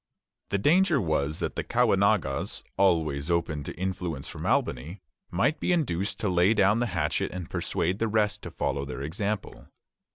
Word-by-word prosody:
The 100 - +1
danger 170 - +4
was 80 - 0
that - - -2
the - - -2
Caughnawagas, - - +1
always 80 -6 +2
open 80 -4 0
to - - -6
influence 90 -6 -3
from - - -5
Albany, 75 +10 0 0.3
might 125 - +1
be - - 0
induced 105 - 0
to 105 - 0
lay 90 +4 +3
down 105 +2 +4
the 120 - +1
hatchet 75 -2 0
and 90 -3 -6
persuade 90 +4 -1
the 115 - +1
rest 105 -1 +1
to - - -7
follow 70 - -2
their 70 -1 -5
example. 100 +7 -4
95 Hz, 165 wpm, -27 LUFS, 80-105 Hz, 0.3 s, danger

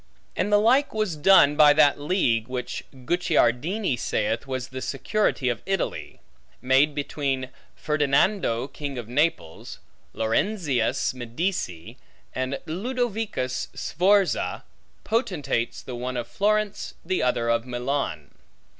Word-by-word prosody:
And 205 - -1
the 205 - +6
like 245 +5 +3
was 215 -6 -1
done 150 -2 +6
by 150 -1 +7
that 145 -1 +4
league 135 - +1
(which 125 -1 -4
Guicciardini 155 - 0
saith 115 +5 -1
was 130 -1 -4
the 130 0 -6
security 145 -1 -1
of 120 -2 -1
Italy) 195 -2 -3 0.4
made 135 +3 +3
between 140 -3 -2 0.3
Ferdinando 145 - +1
King 140 -1 -6
of 120 -3 -6
Naples, 125 - -1 0.4
Lorenzius 130 - 0
Medici, 120 - -4 0.4
and 130 +1 -2
Ludovicus 215 - -2
Sforza, 190 +3 +1 0.4
potentates, 150 - -1
the 130 - -7
one 125 +1 -4
of 120 -1 -3
Florence, 210 - -1
the 185 +2 0
other 120 -2 +1
of 115 +1 0
Milan. 125 - -3
140 Hz, 115 wpm, -25 LUFS, 125-190 Hz, 0.4 s, by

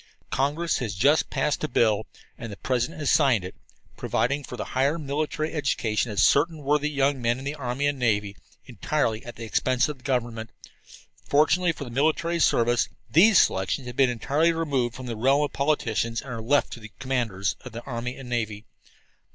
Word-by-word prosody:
"Congress 150 +5 0
has 110 -6 -3
just 145 +10 +3
passed 150 - -1
a - - +1
bill, 110 -5 +1 0.3
and 115 -2 -8
the 100 - -8
President 130 +5 -2
has 145 - +1
signed 135 - +3
it, 90 - -7 0.4
providing 140 +4 0
for - - -8
the - - -4
higher 140 +5 +2
military 155 +1 -2
education 120 -7 0
of 105 - -3
certain 155 +1 +3
worthy 150 +1 +1
young 140 -2 +1
men 120 0 +1
in 135 - -8
the 140 - -2
army 135 -1 -3
and 145 -1 0
navy, 105 -4 0 0.3
entirely 120 -1 -1
at 120 - -9
the 115 - -8
expense 125 +4 +1
of 150 -3 -6
the - - -23
government. 120 -4 -2 0.7
Fortunately 165 +4 +3
for 150 - -7
the 125 - -8
military 160 +6 +1
service, 120 -4 +2 0.2
these 195 +5 +6
selections 95 +7 +1
have 125 -1 -7
been 135 -1 +4
entirely 145 +8 +1
removed 140 -8 -1
from 130 - -8
the 120 -2 -4
realm 135 +6 +3
of 145 - -3
politics 140 -6 0
and 115 0 -3
are 120 -4 -5
left 140 +6 +1
to - - -8
the 105 -1 -11
commanders 115 -7 -1
in 130 - -9
the 115 +1 -7
army 125 -1 -5
and 135 - -9
navy. 110 -3 -3
130 Hz, 190 wpm, -25 LUFS, 115-145 Hz, 0.7 s, these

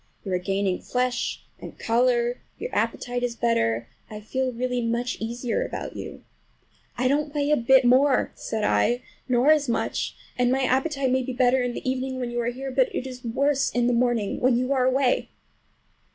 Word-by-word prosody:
You 190 - -3
are 180 - +1
gaining 195 0 -1
flesh 250 -1 -1 0.2
and - - -10
color, 240 +1 +1 0.2
your 485 - -6
appetite 245 0 -1
is 245 -1 -2
better. 115 - 0 0.2
I 210 - -7
feel 260 +5 -2
really 250 +1 -2
much 235 +2 -1
easier 240 - -2
about - - -6
you." - - -8 0.7
"I 255 +1 +1
don't 290 +2 +1
weigh 290 0 +1
a - - +6
bit 260 +1 +4
more," 260 +2 +4
said 220 -1 -4
I, 225 - +2 0.3
"nor 250 +4 +4
as 295 -4 +3
much; 235 - -1 0.2
and 245 0 +3
my 265 +1 +1
appetite 265 +1 +1
may 260 0 +2
be 260 0 -4
better 255 +1 +3
in 245 -1 -1
the - - -6
evening, 260 0 -2
when 245 -1 -3
you 240 0 -1
are 235 - -2
here, 265 +3 -4
but 260 -1 +2
it - - -2
is 255 -1 -8
worse 275 +4 +1
in 245 0 0
the 245 - +2
morning 235 -4 +1
when 250 -1 +3
you 255 +2 0
are 255 -2 +2
away." 260 0 +2
250 Hz, 195 wpm, -25 LUFS, 235-260 Hz, 0.7 s, a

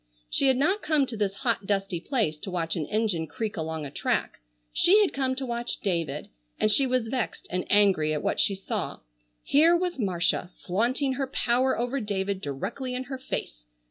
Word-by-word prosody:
She 275 - +3
had 260 -1 +4
not 375 +10 +2
come 305 -3 +2
to 245 - -6
this 205 -2 -1
hot 230 -5 +1
dusty 195 -3 0
place 195 - -1
to 195 - -6
watch 165 -3 -1
an 155 -4 -2
engine 205 -7 0
creak 220 +7 -4
along 160 -2 -3
a 140 - -7
track, - - -1 0.3
she 395 +4 +5
had 410 -3 +3
come 260 -1 0
to 265 0 -2
watch 240 0 -3
David, 165 -7 -2 0.3
and 215 - +3
she 270 +4 +4
was 250 -2 +1
vexed 245 -1 -3
and 180 0 -2
angry 195 -7 +4
at 150 - -1
what - - 0
she 200 - +2
saw. 190 - -4 0.4
Here 325 +4 +5
was 355 -4 -2
Marcia 175 -4 0 0.2
flaunting 245 +8 +1
her 270 +1 -2
power 255 0 +1
over 245 +3 -1
David 200 -3 -2
directly 250 - -4
in 255 - -2
her 260 0 -6
face. - - -5
220 Hz, 195 wpm, -27 LUFS, 180-260 Hz, 0.4 s, she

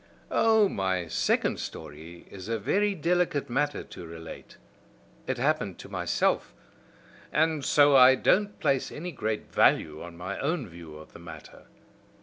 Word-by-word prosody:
"Oh! 220 -2 +4
my 95 - -2
second - - 0
story 80 +4 -9
is 95 +1 -9
a 115 - 0
very 200 - 0
delicate 170 -5 0
matter 145 +3 -1
to - - -11
relate. 80 0 -10 0.7
It 130 - -1
happened 135 - 0
to - - -11
myself, - - -1 0.8
and 155 -1 +1
so 145 +1 +5
I 130 0 +8
don't 205 +9 +1
place 135 -1 0
any 175 +4 -6
great 110 -6 -4
value 75 0 +2
on 85 -1 -10
my 95 +3 -5
own 145 -3 -1
view 85 -3 -11
of 80 - -14
the - - -12
matter. 80 -2 -12
125 Hz, 145 wpm, -27 LUFS, -, 0.8 s, I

